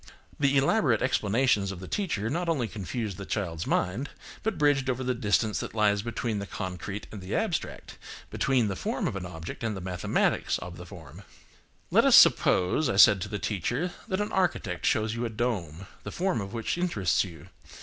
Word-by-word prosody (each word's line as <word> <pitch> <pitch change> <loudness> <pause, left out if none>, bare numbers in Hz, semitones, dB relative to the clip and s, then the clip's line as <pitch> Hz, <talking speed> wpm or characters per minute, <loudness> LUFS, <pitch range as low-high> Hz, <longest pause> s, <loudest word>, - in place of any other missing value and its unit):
The 140 -1 +3
elaborate 135 - +3
explanations 110 -4 +1
of 95 - -7
the 95 - -8
teacher 155 - -2
not 170 +7 -1
only 135 -8 0
confused 105 0 -4
the 100 - -6
child's 85 -6 -3
mind, 115 +11 0 0.3
but 220 -4 -2
bridged 145 -3 +2
over 130 0 -1
the 125 0 0
distance 110 -1 +1
that - - -6
lies 105 -2 +3
between 115 -1 -3
the 100 - -5
concrete 95 +3 -5
and 105 - -8
the 90 - -4
abstract, - - -3 0.3
between 130 -5 +1
the 100 - -2
form - - -2
of - - -3
an 90 -2 -4
object 80 +4 -8
and 110 -3 -2
the - - -5
mathematics 90 -1 0
of 90 -1 -8
the 90 - -10
form. 85 -2 -12 0.7
Let - - +5
us - - +7
suppose, 90 +12 +5
I - - 0
said 100 -1 +7
to 105 - -4
the 105 - -3
teacher, 120 - -2 0.2
that 185 - -1
an 210 - -3
architect 115 - 0
shows 110 0 +1
you 115 +1 -3
a 120 - -1
dome, 100 -7 -3 0.2
the - - -7
form 180 - -1
of 95 0 -6
which 115 +8 -2
interests 105 - +1
you. 85 -4 -11
105 Hz, 195 wpm, -28 LUFS, 95-130 Hz, 0.7 s, us